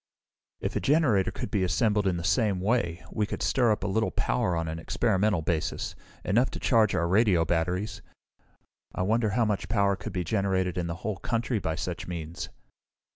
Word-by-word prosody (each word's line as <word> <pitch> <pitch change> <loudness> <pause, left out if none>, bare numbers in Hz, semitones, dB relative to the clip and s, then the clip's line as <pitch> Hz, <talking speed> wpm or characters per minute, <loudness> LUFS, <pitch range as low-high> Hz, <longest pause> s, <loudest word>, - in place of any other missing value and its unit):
"If - - -3
a - - +2
generator 130 - +3
could 95 - -5
be 100 -3 +1
assembled 105 +2 +2
in 90 -2 +1
the 85 - -4
same 95 +3 +2
way, 95 -4 0
we 105 -1 0
could - - -4
stir 120 -4 +3
up 105 - -1
a - - -1
little 110 +3 +1
power 110 -8 0
on 80 0 -2
an 80 +1 -4
experimental 100 -1 +1
basis, 80 -1 -2 0.3
enough 120 +7 +3
to - - -7
charge 110 -4 +3
our 85 - +1
radio 95 -3 +3
batteries. 90 +5 -1 0.9
I - - 0
wonder 110 +3 +2
how 120 - +4
much 105 -2 -2
power 100 -3 +2
could - - -7
be 90 - -1
generated 95 -1 0
in 85 -1 -2
the 85 - -3
whole 105 -3 -1
country 115 +3 -1
by 80 -4 -2
such - - -4
means?" 85 -2 -5
100 Hz, 190 wpm, -28 LUFS, 85-110 Hz, 0.9 s, how